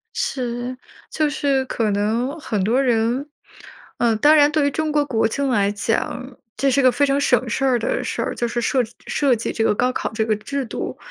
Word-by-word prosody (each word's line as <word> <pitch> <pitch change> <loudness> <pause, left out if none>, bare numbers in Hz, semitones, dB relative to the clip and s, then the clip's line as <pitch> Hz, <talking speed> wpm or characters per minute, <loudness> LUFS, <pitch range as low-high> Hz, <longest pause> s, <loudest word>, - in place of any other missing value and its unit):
是， 245 0 -3 0.3
就 310 -1 0
是 275 -2 0
可 225 -3 -1
能 230 +9 -1
很 210 -9 -2
多 240 +7 +2
人 245 +3 +1 0.7
呃， 230 -2 +2
当 295 +7 +5
然 295 -1 +5
对 295 -2 +2
于 285 - 0
中 310 +1 -1
国 295 -1 +2
国 225 -5 +1
情 275 +4 -2
来 205 -4 +2
讲， 240 +4 -3 0.2
这 275 - +1
是 275 +1 +3
个 255 - +6
非 265 +4 0
常 275 0 +1
省 250 -3 +2
事 270 +3 -1
儿 250 -2 +2
的 - - -1
事 - - -3
儿， - - -3
就 240 - -1
是 240 +1 -2
设 260 - +1 0.3
设 275 -4 +2
计 225 - -3
这 225 - -1
个 225 - +3
高 250 +4 +1
考 - - -3
这 220 0 0
个 215 -1 +1
制 275 +5 -4
度。 - - -5
250 Hz, 230 characters per minute, -21 LUFS, 230-280 Hz, 0.7 s, 个